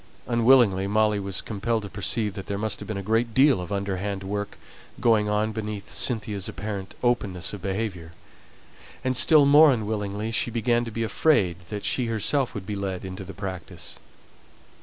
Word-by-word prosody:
Unwillingly, 115 -5 +4
Molly 105 0 +2
was 95 -1 -2
compelled 110 +1 -2
to - - -5
perceive 105 +1 -1
that 95 -1 -8
there 100 - -2
must 110 0 -2
have - - -8
been 110 - -4
a 100 - -4
great 115 +2 0
deal 135 -6 +5
of 90 - -7
underhand 100 0 -3
work 105 +1 -4 0.4
going 110 -3 +3
on 105 +1 +1
beneath 105 -2 -5
Cynthia's 105 -5 0
apparent 100 -2 -6
openness 100 -8 0
of 100 - -7
behaviour; 95 -4 -4 0.9
and 130 0 0
still 150 +2 +6
more 145 +2 +7
unwillingly 105 -2 -2
she 115 - 0
began 120 +1 +1
to 115 - -6
be 115 +1 -2
afraid 105 - +2
that 105 -1 -5
she 125 -3 0
herself 115 +4 0
might 100 -3 -5
be 105 - -4
led 95 -2 -4
into 95 +1 -6
the 95 +1 -9
practice. 95 -4 -7
105 Hz, 175 wpm, -25 LUFS, 100-115 Hz, 0.9 s, more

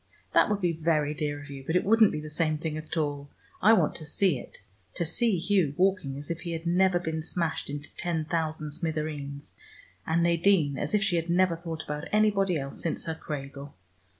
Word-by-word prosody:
"That - - +5
would 205 -1 0
be 175 -2 +2
very 155 -2 +1
dear 145 -1 -3
of 145 0 -10
you, 135 -1 -8
but 160 +5 -2
it 180 - +3
wouldn't 220 0 +5
be 150 - -3
the 155 - -7
same 155 -1 +1
thing 155 0 -3
at 155 +2 -5
all. 145 -2 -2 0.3
I 215 +3 +7
want - - +3
to 160 - -8
see 175 -3 +2
it, 100 - -13 0.3
to 170 - -1
see 225 +4 +2
Hugh 170 -5 +1
walking 185 -8 +1
as 145 +3 -5
if 170 - -3
he 170 -2 -4
had 165 +1 -5
never 180 +1 +3
been 160 -2 -3
smashed 165 -1 -2
into 145 +1 -7
ten 165 -3 -1
thousand 155 -2 -2
smithereens, 150 -3 -4 0.5
and 165 +1 +2
Nadine, 170 -3 +3
as 145 +9 -1
if 205 - +2
she 180 -3 +1
had 165 +1 -2
never 180 0 +3
thought 165 -1 -6
about 150 +1 -5
anybody 200 -4 +3
else 135 -1 -4
since 165 - -2
her 160 - -2
cradle. 140 -2 -7
160 Hz, 210 wpm, -28 LUFS, 150-180 Hz, 0.5 s, I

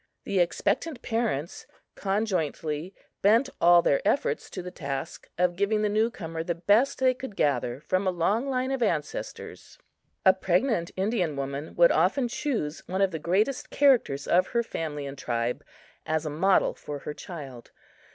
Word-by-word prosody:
The 195 - 0
expectant 245 - 0
parents 225 -9 -2 0.3
conjointly 180 -5 -2 0.3
bent 230 +7 +4
all 175 0 +7
their 140 - +2
efforts 280 - 0
to 185 - -6
the 180 - -7
task 140 0 -5
of 180 0 +2
giving 205 +3 +1
the 210 - +2
new 215 +2 +2
comer 165 -7 -6
the 170 0 -2
best 205 +10 +3
they 260 -1 +3
could 255 -4 -8
gather 125 -5 0
from 185 +5 0
a - - +5
long 200 +9 0
line 260 0 -1
of 265 -2 -2
ancestors. 165 -10 -3 0.5
A 190 - +8
pregnant 190 0 +1
Indian 190 -6 0
woman 140 +2 -5
would 170 0 +6
often 210 - +2
choose 225 - -2
one 190 +2 -1
of 195 - +2
the 160 - -4
greatest 205 - 0
characters 245 - +3
of 185 +1 +3
her 235 -1 0
family 150 -9 -4
and 140 0 -7
tribe 120 0 -2 0.4
as 160 0 0
a 150 - -2
model 190 +6 +3
for 145 - -7
her 150 - -6
child. 140 -9 -9
180 Hz, 165 wpm, -27 LUFS, 155-220 Hz, 0.5 s, A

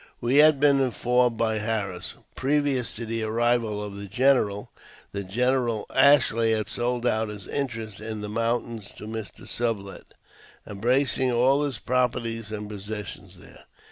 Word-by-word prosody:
We 125 +4 +1
had 150 -1 +7
been 140 -1 +5
informed 125 -2 +1
by 110 -1 0
Harris, 105 -4 -3 0.2
previous 140 -2 0
to 115 - -5
the 115 0 -3
arrival 115 -1 0
of 100 -1 -7
the 100 0 -7
general, 105 -2 +1 0.4
that 100 -1 -4
General 120 0 +1
Ashley 115 -5 +5
had 110 -1 -1
sold 120 0 -1
out 110 -2 +1
his 105 -2 -8
interest 115 -7 -4
in 110 0 -5
the 105 - -4
mountains 115 -1 -2
to - - -12
Mr. 110 -3 -7
Sublet, 110 -5 -3 0.5
embracing 125 +5 +1
all 130 +4 +3
his 140 -5 -1
properties 115 -2 -1
and 105 -1 -5
possessions 105 0 -7
there. - - -15
115 Hz, 145 wpm, -25 LUFS, 105-125 Hz, 0.5 s, had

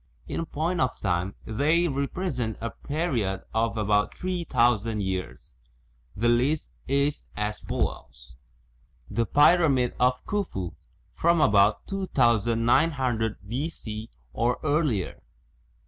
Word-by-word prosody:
In - - -2
point 165 +4 -1
of 130 -1 0
time 90 0 -1
they 155 +10 +2
represent 140 - -2
a 115 - -4
period 125 - -2
of 115 0 0
about 105 -1 +1
three 180 -2 -3
thousand 115 -5 +2
years. 95 -1 -4 0.6
The 115 +4 +1
list 125 +6 +1 0.2
is 140 +2 0
as 105 0 -2
follows: 70 -4 -4 0.8
The 115 -1 0
Pyramid 145 -5 +4
of 125 0 +2
Khufu, 170 - -2 0.4
from 170 0 +2
about 105 -5 +4
2900 120 - +1
B.C., 115 -4 -5 0.2
or 120 +1 +1
earlier. 145 - 0
120 Hz, 105 wpm, -26 LUFS, 105-150 Hz, 0.8 s, Pyramid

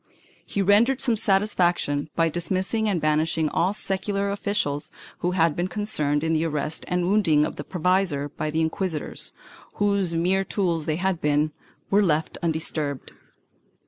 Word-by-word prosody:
He 200 - -2
rendered 225 +7 +4
some 245 -4 +2
satisfaction 180 -8 +1
by 165 -1 +3
dismissing 185 +6 -1
and 185 -4 0
banishing 155 +1 +1
all 175 +5 +1
secular 200 0 -1
officials 200 -8 -2 0.3
who 180 +1 -1
had 165 -2 +3
been 175 +1 -1
concerned 155 -8 0
in 160 0 +1
the 160 0 +1
arrest 155 -1 -1
and 180 0 0
wounding 170 -7 +3
of - - -5
the 145 - -6
provisor, 180 -5 0
but 155 0 -3
the 160 - +1
inquisitors, 160 -1 -3 0.4
whose 200 -4 +1
mere 185 +4 +2
tools 175 -5 -1
they 155 - +1
had 185 0 -1
been, 150 +1 +2 0.4
were 200 +1 +5
left 160 -5 0
undisturbed. 155 -4 -2
175 Hz, 150 wpm, -24 LUFS, 155-195 Hz, 0.4 s, were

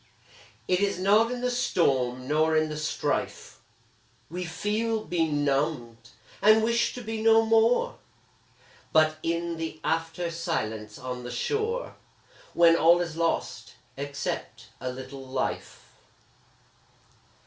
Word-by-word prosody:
It 180 0 +2
is 200 -2 0
not 210 +5 +3
in 250 -1 -4
the 250 0 0
storm 130 - 0
nor 155 +2 +2
in 155 0 +1
the 155 - -4
strife 155 0 -3 0.7
We 180 +1 -4
feel 215 +6 -2
benumbed, 145 -7 -1 0.3
and 215 +2 +6
wish 235 +1 +1
to 245 - -7
be 220 0 -4
no 225 0 +5
more, 225 - +3 0.9
But 155 0 +4
in 170 0 -2
the 160 -1 -5
after 165 +1 -1
silence 110 -11 -3
on 125 -1 -6
the 120 - -6
shore, 435 - -2 0.6
When 170 -1 +6
all 170 +1 +5
is 170 -2 -3
lost, 165 0 -2 0.2
except 140 0 -5
a 130 - -4
little 130 +1 -9
life. 130 0 -4
165 Hz, 120 wpm, -27 LUFS, 140-215 Hz, 0.9 s, and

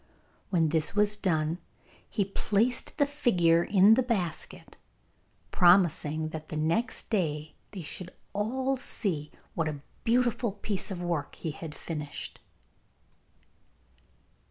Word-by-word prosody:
When 165 -5 +2
this 160 +3 +2
was 210 0 +4
done 165 -4 0 0.5
he 200 - 0
placed 215 +5 0
the 285 - +4
figure 180 - +3
in 200 +3 +6
the 250 - +4
basket, 200 -10 -3 0.8
promising 170 -4 +4
that 155 -1 -7
the 155 - -5
next 170 +13 0
day 155 -7 -1 0.2
they 190 -4 -7
should 180 +3 -5 0.2
all 260 +6 0
see 170 - -2 0.2
what 165 -1 0
a 145 -2 -4 0.2
beautiful 240 -2 +2
piece 200 -1 -2
of 180 -3 -4
work 170 -5 -2
he 160 - -4
had 155 0 -8
finished. 150 -3 -6
180 Hz, 120 wpm, -29 LUFS, 160-215 Hz, 0.8 s, in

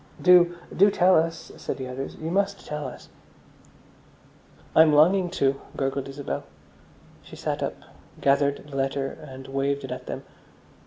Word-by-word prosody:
"Do, 175 -1 +6 0.2
do 200 +2 +6
tell 185 -1 +4
us," 165 0 0
said - - -4
the 130 -2 -5
others. 130 +2 -6
"You 160 +1 -5
must 200 +1 0
tell 150 -2 -4
us." 125 - -11 1.7
"I'm 160 -1 +7
longing 175 +5 +5
to," 140 -5 0 0.2
gurgled 135 0 -2
Isabel. 140 +1 -4 0.8
She - - -13
sat - - -3
up, - - -2 0.4
gathered 140 +1 +2
the 140 - -9
letter, 135 0 0
and 135 -2 -11
waved 140 +1 -1
it 130 - -6
at 125 - -6
them. - - -5
145 Hz, 150 wpm, -25 LUFS, 135-175 Hz, 1.7 s, I'm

